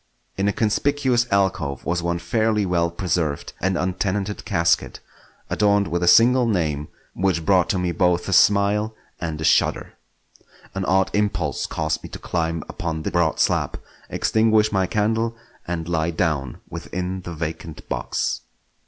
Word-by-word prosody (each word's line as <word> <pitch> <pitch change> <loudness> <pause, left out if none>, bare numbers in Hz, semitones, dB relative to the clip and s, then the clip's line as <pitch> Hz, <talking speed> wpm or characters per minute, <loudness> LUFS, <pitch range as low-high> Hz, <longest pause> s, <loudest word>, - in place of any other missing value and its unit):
In 100 +1 0
a - - +3
conspicuous 125 +3 +1
alcove 95 -9 0
was 85 +1 0
one 85 0 -1
fairly 105 +4 0
well 85 -2 +1
preserved 85 -4 -2
and 95 -1 +1
untenanted 95 +2 -2
casket, 85 -5 +1 0.5
adorned 100 -2 +2
with 85 +1 -1
a 90 - +1
single 120 +6 +6
name 75 -8 -1 0.3
which 90 -3 0
brought 95 +2 +3
to 100 - +1
me 90 -1 0
both 90 -1 +1
a 95 - -1
smile 105 +3 +3 0.2
and 80 -3 -4
a - - -4
shudder. - - +2 0.8
An 95 -1 -2
odd 95 +1 +2
impulse 105 0 0
caused 80 -1 -2
me - - -9
to - - -7
climb 80 -1 -2
upon 80 -2 -4
the - - -2
broad 85 -2 +1
slab, - - +1 0.3
extinguish 110 -1 +2
my 95 -2 +1
candle, 110 +3 0 0.3
and 85 -2 -3
lie 80 -1 0
down 75 -6 -1
within 90 +1 -5
the 85 -1 -7
vacant 80 0 -6
box. - - -2
90 Hz, 155 wpm, -22 LUFS, 85-105 Hz, 0.8 s, single